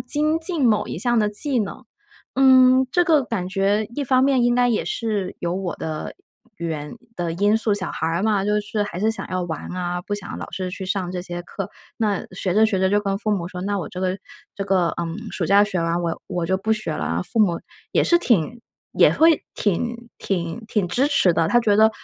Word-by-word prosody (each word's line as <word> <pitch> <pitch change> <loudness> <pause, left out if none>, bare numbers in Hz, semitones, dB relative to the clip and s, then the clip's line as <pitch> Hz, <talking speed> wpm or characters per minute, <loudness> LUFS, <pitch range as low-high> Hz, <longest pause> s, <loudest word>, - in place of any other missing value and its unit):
精 305 +2 +1
进 320 -7 +1
某 210 - +1
一 - - -4
项 240 +5 +1
的 210 -2 +3
技 250 +4 +2
能。 200 -2 -5 0.6
嗯， 260 -1 +6
这 355 - +4
个 315 -4 +4
感 195 -6 -3
觉 200 +3 +1
一 290 - -1
方 255 0 +3
面， 265 -2 +3
应 240 0 +3
该 245 0 +3
也 225 - 0
是 210 -5 -2
有 170 0 -1
我 190 -3 -3
的 155 -1 -5 0.4
原 155 -3 -4 0.2
的 175 -2 -2
因 205 +5 +2
素， 220 -2 +2
小 190 -3 -2
孩 160 - -3
儿 170 +3 -1
嘛， 210 -2 +1
就 210 +1 +1
是 210 0 -2
还 185 -3 -6
是 220 +2 +2
想 225 - -5
要 185 0 -2
玩 160 -3 -5
啊， 175 -1 -2
不 205 - -3
想 205 - -6
老 - - -7
是 185 -1 -3
去 190 +1 -6
上 185 -2 -2
这 180 -1 -4
些 175 -1 -6
课。 190 +2 -6 0.3
那 210 -4 0
学 185 0 -2
着 215 +2 +5
学 215 -3 +1
着 190 0 +2
就 205 +2 +2
跟 195 -1 -2
父 215 -1 -1
母 175 -4 -2
说， 180 0 -7
那 205 +1 -1
我 - - -5
这 180 - -7
个 185 0 0 0.4
这 200 - -4
个 185 -3 +2
嗯， 165 0 -4 0.2
暑 180 - -1
假 200 +3 +5
学 185 -4 -2
完 165 +1 0
我 170 -1 -3
我 175 -2 -2
就 190 +1 +1
不 220 +3 0
学 215 -7 -2
了 - - -4
啊。 85 +2 -1
父 225 - 0
母 175 -5 +3 0.3
也 - - +2
是 345 - +5
挺 235 - +1 0.3
也 - - +5
会 325 0 +4
挺 235 +4 -1
挺 185 +3 -3
挺 205 -4 0
支 255 +10 +1
持 275 - +4
的， 165 0 +1
他 240 - +4
觉 220 -4 +2
得： 220 +1 +6
200 Hz, 250 characters per minute, -22 LUFS, 180-230 Hz, 0.6 s, 嗯